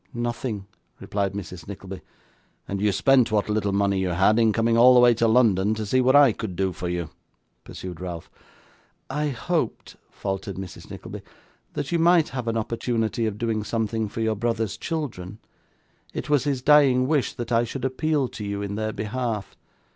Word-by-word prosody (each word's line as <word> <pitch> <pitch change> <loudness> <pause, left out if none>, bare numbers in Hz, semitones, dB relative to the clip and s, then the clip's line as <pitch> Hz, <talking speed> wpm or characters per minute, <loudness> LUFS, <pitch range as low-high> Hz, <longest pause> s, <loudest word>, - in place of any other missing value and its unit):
'Nothing,' 120 -3 -3 0.3
replied 100 -1 -2
Mrs. 90 -4 -7
Nickleby. 95 -1 -8 0.7
'And 100 0 -3
you 105 0 +3
spent 120 +4 +3
what 105 -1 +1
little 105 -1 0
money 100 -1 +1
you 95 -1 0
had, 95 +6 +3
in 115 -1 +4
coming 115 +1 +1
all 125 +2 +7
the - - +7
way 120 -1 +6
to 115 0 +1
London, 110 -3 +3
to 110 0 -4
see 130 +6 +2
what 130 +2 +4
I 145 -3 +7
could 105 -4 -6
do 95 0 0
for 90 - -4
you?' 85 -3 -3 0.5
pursued 90 -2 -8
Ralph. 85 -3 -6 0.8
'I 150 +2 -1
hoped,' 145 0 -3
faltered 95 -1 -4
Mrs. 95 -1 -9
Nickleby, - - -8 0.5
'that 140 - -4
you 170 - +1
might 170 -1 +4
have 125 -3 -5
an 115 0 0
opportunity 115 0 -1
of 105 -1 -4
doing 110 -2 -1
something 110 -1 -2
for 115 - -5
your 110 -1 +1
brother's 115 -1 -1
children. 115 - -5 0.8
It 150 - -4
was 145 -2 +3
his 135 -3 -1
dying 140 -4 +5
wish 145 -4 +1
that 120 - -6
I 115 0 +3
should 125 +2 -4
appeal 145 +1 0
to 105 - -8
you 100 0 -3
in 100 0 -4
their 110 +1 -2
behalf. 110 -2 -3
110 Hz, 185 wpm, -24 LUFS, 100-125 Hz, 0.8 s, all